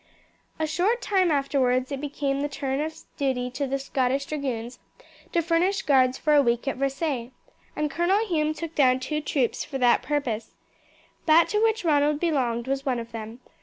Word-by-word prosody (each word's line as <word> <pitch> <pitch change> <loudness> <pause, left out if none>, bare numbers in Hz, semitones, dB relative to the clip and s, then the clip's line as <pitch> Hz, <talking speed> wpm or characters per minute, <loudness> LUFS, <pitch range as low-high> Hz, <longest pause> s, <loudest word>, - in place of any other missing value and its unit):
A 315 - 0
short 365 +10 +1
time 380 -6 +2
afterwards 270 -3 +1
it 275 -1 -3
became 280 -1 -2
the 290 - -1
turn 270 0 -2
of 315 +1 -5
duty 250 -3 -1
of 275 - -2
the 275 - 0
Scottish 270 0 -1
Dragoons 255 -5 -4 0.5
to 340 - +1
furnish 350 +4 +1
guards 260 -3 +3
for 305 - +1
a 290 - +7
week 240 0 0
at 270 - -1
Versailles, 275 -2 -2 0.5
and 300 -1 -1
Colonel 375 +8 +2
Hume 310 -5 0
took 330 0 -6
down 260 -4 +4
two 300 +4 -3
troops 270 -5 0
for 270 - -5
that 245 -2 +4
purpose. 250 -7 -3 0.7
That 325 +2 +6
to 420 - +1
which 450 -3 +1
Ronald 295 -1 +3
belonged 255 -8 0
was 270 0 -1
one 260 -3 0
of 230 0 -6
them. 225 +2 -8
280 Hz, 180 wpm, -25 LUFS, 255-310 Hz, 0.7 s, a